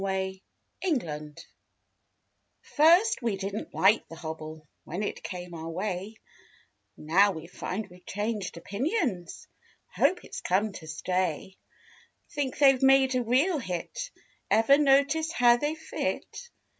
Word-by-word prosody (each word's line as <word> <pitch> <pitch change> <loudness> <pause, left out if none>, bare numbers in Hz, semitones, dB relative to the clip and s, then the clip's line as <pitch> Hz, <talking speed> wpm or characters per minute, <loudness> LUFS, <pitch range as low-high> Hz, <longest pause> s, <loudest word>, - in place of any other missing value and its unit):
K., 190 -1 -2 0.4
MISS 335 -8 +2
HOBBLE 150 -2 -7 1.3
First 345 +8 +4
we 230 -5 -1
didn't 195 +2 -5
like 205 +4 +4
the 165 - -10
hobble 155 -1 -8 0.2
When 180 +6 -4
it - - -4
came 180 -1 -7
our 165 0 -6
way; 190 +4 -4 0.8
Now 190 +6 +3
we 160 -1 -8
find 185 +4 -5
we've 180 0 -17
changed 205 -3 -3
opinions— 200 - -2 0.5
Hope 365 - +2
it's - - -7
come 205 +4 +1
to 160 -4 -10
stay. 180 +2 -2 0.8
Think 280 -3 -2
they've 270 -3 +5
made 270 0 +5
a 255 - +1
real 275 +9 +2
hit. 185 - -5 0.4
Ever 225 +6 +5
notice 290 +3 +3
how 240 -6 +5
they 295 +4 -1
fit? 320 +8 -5
205 Hz, 130 wpm, -28 LUFS, 180-270 Hz, 1.3 s, they've